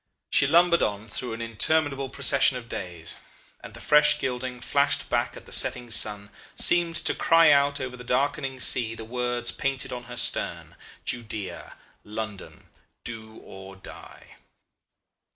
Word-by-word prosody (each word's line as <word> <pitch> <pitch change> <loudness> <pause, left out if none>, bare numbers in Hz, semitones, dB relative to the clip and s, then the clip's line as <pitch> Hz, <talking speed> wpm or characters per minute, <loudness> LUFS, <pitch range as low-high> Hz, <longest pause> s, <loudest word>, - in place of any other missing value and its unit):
She 140 - +4
lumbered 170 +2 +4
on 105 +2 -2
through 120 +3 -4
an 115 +1 -5
interminable 135 +4 +1
procession 140 -1 +4
of 120 -2 -10
days; 85 -6 -5 0.5
and - - -11
the - - -10
fresh 150 0 +4
gilding 125 -1 -4
flashed 140 +3 0
back - - -1
at - - -13
the - - -15
setting 120 -2 +1
sun, 105 -2 0 0.2
seemed 170 -1 +3
to - - +1
cry 165 -2 +5
out 140 0 +3
over 130 -1 -5
the 125 - -11
darkening 135 +1 -1
sea 115 -2 +2
the 115 - -9
words 120 0 -2
painted 135 -2 -3
on 125 -1 -7
her 125 0 -10
stern, - - -1 0.3
'Judea, 110 -6 -6 0.3
London. 105 -2 -8 0.3
Do 110 -2 -8
or 95 0 -12
Die. 95 - -14
125 Hz, 150 wpm, -25 LUFS, 110-140 Hz, 0.5 s, cry